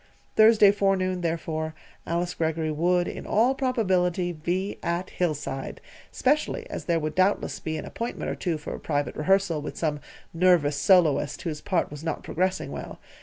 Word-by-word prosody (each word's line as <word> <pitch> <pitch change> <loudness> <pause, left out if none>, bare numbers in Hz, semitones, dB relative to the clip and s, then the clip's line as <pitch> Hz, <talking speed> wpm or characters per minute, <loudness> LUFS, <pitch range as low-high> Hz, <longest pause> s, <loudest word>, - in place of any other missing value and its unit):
Thursday 215 -2 +7
forenoon, 190 -2 +1
therefore, 160 -1 -2 0.3
Alice 175 +1 -1
Greggory 160 -1 -1
would, 175 +3 +1
in - - -6
all 235 +5 +3
probability, 185 -9 +1
be 175 +4 -3
at 170 +2 -2
Hillside, 150 -6 -3 0.3
specially 305 - 0
as - - -5
there 170 -1 +1
would 155 0 -3
doubtless 185 +3 +1
be 160 0 -3
an - - -5
appointment 235 +1 -4
or - - -3
two 170 -4 -2
for 150 - -6
private 145 -2 -2
rehearsal 180 -1 +2
with 150 - -7
some 150 -3 -1 0.3
nervous 165 -4 +3
soloist 165 -1 +3
whose 155 -4 -4
part 180 -6 0
was 150 +1 -8
not 160 -2 -3
progressing 185 +2 -1
well. - - -7
175 Hz, 160 wpm, -26 LUFS, 155-190 Hz, 0.3 s, Thursday